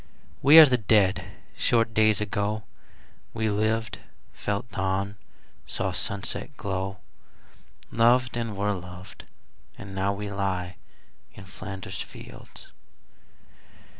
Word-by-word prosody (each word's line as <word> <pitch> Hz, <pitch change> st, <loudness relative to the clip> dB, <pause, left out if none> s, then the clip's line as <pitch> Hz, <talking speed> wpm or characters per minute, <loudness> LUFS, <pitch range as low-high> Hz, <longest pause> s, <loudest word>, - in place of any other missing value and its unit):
We 145 Hz, +4 st, +8 dB
are 160 Hz, -, +13 dB
the 125 Hz, -3 st, +2 dB
Dead. 100 Hz, -3 st, +3 dB, 0.3 s
Short 115 Hz, -1 st, +2 dB
days 110 Hz, -1 st, +4 dB
ago 105 Hz, +1 st, -1 dB, 0.7 s
We 110 Hz, -1 st, 0 dB
lived, 110 Hz, +2 st, -1 dB, 0.3 s
felt 105 Hz, +3 st, -3 dB
dawn, 95 Hz, +1 st, -1 dB, 0.5 s
saw -, -, -2 dB
sunset -, -, -4 dB
glow, 95 Hz, 0 st, -3 dB, 0.9 s
Loved, 120 Hz, +2 st, +3 dB
and 115 Hz, -4 st, -3 dB
were 105 Hz, +1 st, +1 dB
loved, 90 Hz, 0 st, -10 dB, 0.5 s
and 100 Hz, -1 st, -9 dB
now 95 Hz, +1 st, 0 dB
we 100 Hz, +1 st, -5 dB
lie 95 Hz, -3 st, -2 dB, 0.6 s
In 95 Hz, -, -11 dB
Flanders 95 Hz, +1 st, -7 dB
fields. -, -, -11 dB
100 Hz, 105 wpm, -26 LUFS, 95-110 Hz, 0.9 s, are